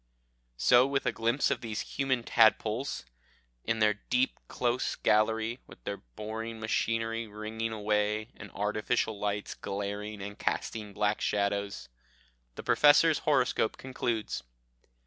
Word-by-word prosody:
So 125 - +6
with 140 0 -1
a - - +2
glimpse 115 +5 +1
of 140 - -1
these 110 -2 -3
human 130 -3 -1
tadpoles, 115 - +2 0.6
in 115 0 0
their 105 -1 +4
deep 125 +5 0
close 120 0 0
gallery, 110 +2 +2
with - - -15
their 100 - -3
boring 110 - -6
machinery 115 +1 -1
ringing 110 +2 -4
away, 105 0 0
and - - -10
artificial 105 +1 0
lights 105 0 -2
glaring 100 +1 -4
and 100 +1 -7
casting 105 -2 -2
black 105 +1 0
shadows, 100 0 -1 0.7
the - - -7
Professor's 150 +2 +5
horoscope 130 -5 +2
concludes. 120 -4 -2
110 Hz, 125 wpm, -30 LUFS, 105-115 Hz, 0.7 s, So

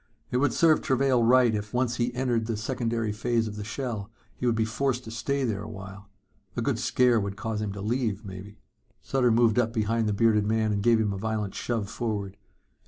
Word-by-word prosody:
It 125 - +1
would 145 +3 +2
serve 160 -2 +4
Travail 130 -1 +2
right 120 0 +5
if, 105 +2 -4
once 125 -1 +1
he 120 0 0
entered 120 -3 0
the 115 -2 -2
secondary 115 -2 -2
plane 115 +1 0
of 105 - -6
the 105 - -5
shell, 115 -3 -4 0.3
he 125 - -2
would 120 - +2
be 110 0 +1
forced 125 +2 -1
to 110 - -8
stay 135 +5 -1
there 110 -5 -1
a 105 - -7
while. 100 -1 -10 0.5
A - - +1
good - - 0
scare 125 -2 +3
would 100 -1 -4
cause 110 -1 -3
him 105 -2 -2
to 100 - -7
leave, 110 -1 -1
maybe. 100 +2 -9 0.5
Sutter 130 -2 +2
moved 115 0 +4
up 115 -2 +1
behind 110 0 0
the - - +1
bearded 105 -1 +3
man 110 0 +1
and 100 -1 0
gave 115 +1 +4
him 105 -2 0
a 95 - -5
violent 110 -2 -2
shove 115 -4 -2
forward. 105 -3 -3
115 Hz, 220 wpm, -27 LUFS, 105-120 Hz, 0.5 s, right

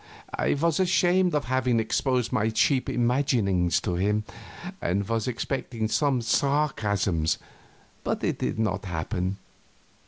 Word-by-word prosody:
I - - +1
was 165 +2 +1
ashamed 180 -1 +3
of 145 - 0
having 125 -2 +1
exposed 125 +2 0
my 110 -2 +2
cheap 130 +4 +2
imaginings 120 -8 +1
to 90 - -2
him, 105 +3 +1 0.6
and 95 +3 0
was 115 0 -1
expecting 120 -2 -2
some 135 -1 +1
sarcasms, 105 - +1 0.7
but - - -2
it - - -1
did - - -2
not 105 -3 -1
happen. 90 +2 -2
115 Hz, 125 wpm, -26 LUFS, 100-140 Hz, 0.7 s, ashamed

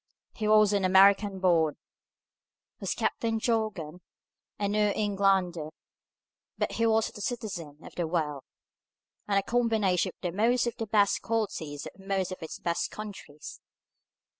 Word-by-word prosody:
He 215 - -3
was 215 -1 +5
an 200 -1 +1
American 195 +1 +5
born, 165 -5 +3 1.0
was - - -2
Captain 225 -1 -1
Jorgan, 210 -8 -2 0.6
a 205 - -1
New 210 0 +2
Englander, 195 -6 +1 0.9
but - - -1
he 230 0 +1
was 220 0 +1
a 210 - -8
citizen 190 - -4
of - - -11
the 170 -2 -2
world, 155 -4 -1 0.9
and 200 -1 +2
a 195 - +2
combination 220 -6 +1
of 175 -2 -2
most 235 +5 +2
of 235 - -2
the 225 - -4
best 205 -1 +3
qualities 180 -10 -3
of - - -11
most 195 -1 -1
of 185 - -7
its 160 - -6
best 170 -1 -1
countries. 195 -8 -9
200 Hz, 140 wpm, -28 LUFS, 175-215 Hz, 1.0 s, was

